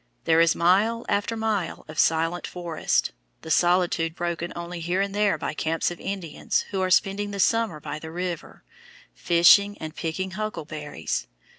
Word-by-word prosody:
There 165 0 +4
is 165 -1 +4
mile 205 +7 +2
after 205 +3 0
mile 215 -6 -2
of 155 0 -7
silent 165 +2 +2
forest, 175 -3 -1 0.3
the 160 - -5
solitude 175 0 +2
broken 170 0 -3
only 170 0 -6
here 175 +3 -1
and 195 0 -1
there 205 -4 +2
by - - -3
camps 160 +2 -1
of 175 - -8
Indians 190 -6 -2
who 195 -2 -1
are 185 - +1
spending 200 +2 +2
the 200 -1 -6
summer 225 -6 +2
by 150 - -6
the 160 - -8
river, 175 +1 -5 0.5
fishing 190 +4 +5
and 155 0 -7
picking 185 +3 -3
huckleberries. 155 - -4
175 Hz, 160 wpm, -25 LUFS, 165-200 Hz, 0.5 s, fishing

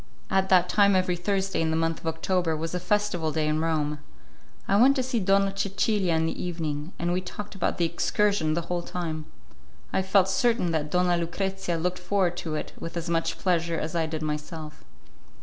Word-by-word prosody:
At 190 0 +2
that 180 -1 +5
time 200 0 +4
every 185 -1 +2
Thursday 195 +1 -1
in 160 - +1
the 160 - +1
month 165 0 0
of - - -8
October 160 0 0
was 165 +2 -4
a 180 - -1
festival 180 -4 0
day 155 0 0
in 155 0 +1
Rome. 150 -2 0 0.7
I 195 - +3
went 275 +3 +6
to 260 - +1
see 250 -2 0
Donna 195 0 +2
Cecilia 195 -2 +1
in 160 0 +2
the 160 - -3
evening, 160 -3 -3
and 175 +1 0
we 180 - 0
talked 205 +3 -7
about 195 - -1
the 170 - +2
excursion 170 -1 +1
the 170 - 0
whole 175 +1 -2
time. 160 -3 -4 0.7
I - - +2
felt 190 0 +3
certain 195 -2 +2
that 155 -2 -1
Donna 180 +1 +2
Lucrezia 180 +1 -2
looked 180 +2 -1
forward 180 -1 +1
to 160 -3 -3
it - - -5
with 165 +1 -5
as 170 0 -3
much 165 0 0
pleasure 170 -2 0
as 155 +2 -4
I 165 -1 +1
did 155 0 -4
myself. 150 0 -5
175 Hz, 200 wpm, -26 LUFS, 160-190 Hz, 0.7 s, went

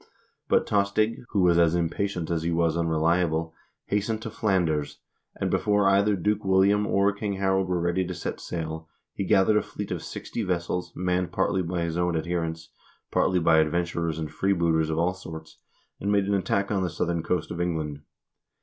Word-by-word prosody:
2 - - -27 0.4
But - - +3
Tostig, 105 +4 +1
who 100 - +1
was 85 -1 +4
as 85 0 +4
impatient 85 +1 -1
as 85 -1 0
he 85 - -1
was 85 -1 +1
unreliable, 80 0 +1 0.3
hastened 110 +2 -1
to 115 - -5
Flanders, 85 -10 0 0.4
and - - -2
before 105 -1 +2
either 100 +1 +4
Duke 105 +3 0
William 100 +2 +3
or 100 +1 +2
King 100 0 -3
Harald 95 -1 +1
were 90 -1 0
ready 85 +2 +1
to - - -4
set - - -5
sail, 80 -1 -5 0.2
he - - -3
gathered 95 +3 +4
a - - +3
fleet 105 -1 -7
of - - -2
sixty - - -5
vessels, 90 -2 -2
manned 90 0 -1
partly 95 - +1
by 85 0 -2
his 85 0 -2
own 90 -1 +1
adherents, 80 -1 -3 0.4
partly 95 - +2
by 80 -2 +4
adventurers 85 0 0
and 80 -2 -4
freebooters 85 -3 +1
of 80 - -1
all 85 +2 +2
sorts, 80 -4 -10 0.4
and 100 - -1
made 100 -1 +3
an 100 - 0
attack 100 +1 0
on 100 -2 +1
the 90 - 0
southern 85 +1 -1
coast 90 0 -2
of 85 - -3
England. 80 -4 -2
90 Hz, 185 wpm, -26 LUFS, 80-100 Hz, 0.4 s, was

